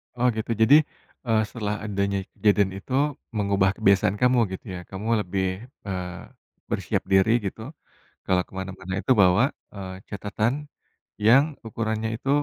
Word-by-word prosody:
Oh, 125 +1 +2
gitu, 110 +1 -3
jadi, 115 +6 +7 0.5
eee, 110 -1 +3
setelah 105 -3 -3
adanya 100 -1 -1 0.2
kejadian 100 -2 +3
itu 115 +6 -8 0.4
mengubah 100 -1 +2
kebiasaan 100 +1 +3
kamu, 125 0 +4 0.2
gitu - - -8
ya? 90 - -5
Kamu 100 +3 -6
lebih, 95 0 -1 0.4
eee, 90 -2 -4 0.5
bersiap - - -1
diri 95 +3 +5 0.2
gitu, 105 - -7 0.7
kalau 90 -1 +3
kemana-mana 95 0 -6
itu 130 - -5
bawa, 90 +4 +5 0.3
eee, 95 -1 -7
catatan 105 +3 -1 0.7
yang 125 +6 +7 0.2
ukurannya 110 0 -2
itu, 135 - -5
100 Hz, 135 wpm, -25 LUFS, 95-110 Hz, 0.7 s, jadi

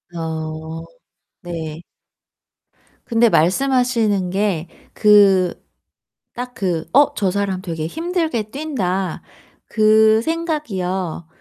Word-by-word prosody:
어. 160 0 -5 0.6
네. 165 -2 -6 1.2
근데 230 -1 +3
말씀하시는 220 - +2
게 190 -4 -1 0.3
그 200 -4 +5 0.8
딱 250 +1 -6
그 175 -4 -2
'어! 285 +1 +4
저 195 -3 0
사람 195 -2 -2
되게 165 -4 -4
힘들게 325 - -2
뛴다.' 195 - -2 0.5
그 220 0 +4
생각이요. 190 - -3
200 Hz, 155 characters per minute, -19 LUFS, 175-245 Hz, 1.2 s, 그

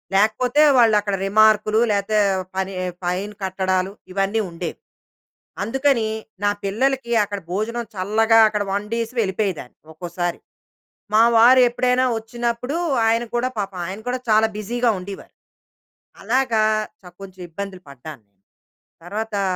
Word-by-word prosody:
లేకపోతే 245 +7 +2 0.2
వాళ్ళక్కడ 210 -4 +3
రిమార్క్‌లు, 215 +1 +4
లేతే 205 +1 +1 0.4
పనీ 190 0 -2 0.3
ఫైన్ 185 +4 -2
కట్టడాలు, 190 0 -1 0.2
ఇవన్నీ 195 +3 0
ఉండేవి. 170 0 -6 0.8
అందుకనీ, 255 0 +1 0.4
నా 205 - +3
పిల్లలకి 240 +4 -1
అక్కడ 205 0 -5
భోజనం, 230 +5 -2
చల్లగా 220 +4 +3
అక్కడ 210 -1 -1
వండేసి 225 +4 -3
వెళ్ళిపోయేదాన్ని, 190 - -3 0.2
ఒక్కోసారి. 175 +1 -4 0.7
మా 220 +1 +6
వారు 250 +3 +7
ఎప్పుడైనా 250 +1 +1
వచ్చినప్పుడు, 235 +5 -3 0.3
ఆయన 230 +1 +2
కూడా 250 +2 0
పాపం, 195 -2 -4
ఆయన 195 +3 -7
కూడా 250 +1 -1
చాలా 220 +1 +4
బిజీగా 240 +3 -1
ఉండీవారు. 195 +2 -10 0.9
అలాగా 235 0 +1 0.4
చ 180 -2 -13
కొంచెం 190 -1 -11
ఇబ్బందులు 190 +1 -7
పడ్డాను. 140 -2 -11 0.8
తర్వాతా 210 +2 -3
210 Hz, 115 wpm, -21 LUFS, 190-235 Hz, 0.9 s, వారు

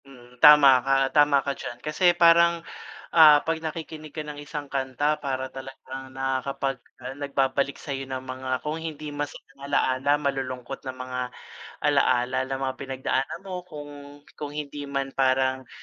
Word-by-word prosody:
Hmm, 125 -3 -16
tama 150 -2 +9 0.2
ka, 135 - 0 0.2
tama 145 -1 +5
ka 140 - 0
diyan. 120 - -7
Kasi 150 +5 -3
parang, 170 0 +5 0.5
ah, 155 -3 +9
pag 165 0 +1
nakikinig 155 -1 -6
ka 155 - -5
ng 150 -1 -7
isang 145 -1 -6
kanta 135 +3 0
para 130 -1 -2
talagang 135 0 -9
nakakapag 135 0 -2 0.2
ano, 130 +1 -6
nagbabalik 140 -1 0
sayo 135 -2 -4
ng 130 -1 -5
mga, 130 0 -4
kung 150 +3 -3
hindi 155 -2 -6
masayang 145 -1 -7
alaala, 140 +2 +2
malulungkot 135 -2 -4
na 130 - -4
mga 130 0 -5 0.6
alaala, 130 -3 +2
na 135 - -2
mga 135 -1 -2
pinagdaanan 135 +5 -3
mo 180 -2 -7
kung, 145 -2 -11
kung 150 - -6
hindi 145 -1 -6
man 135 -1 -3
parang, 130 -1 +1
140 Hz, 150 wpm, -25 LUFS, 130-150 Hz, 0.6 s, tama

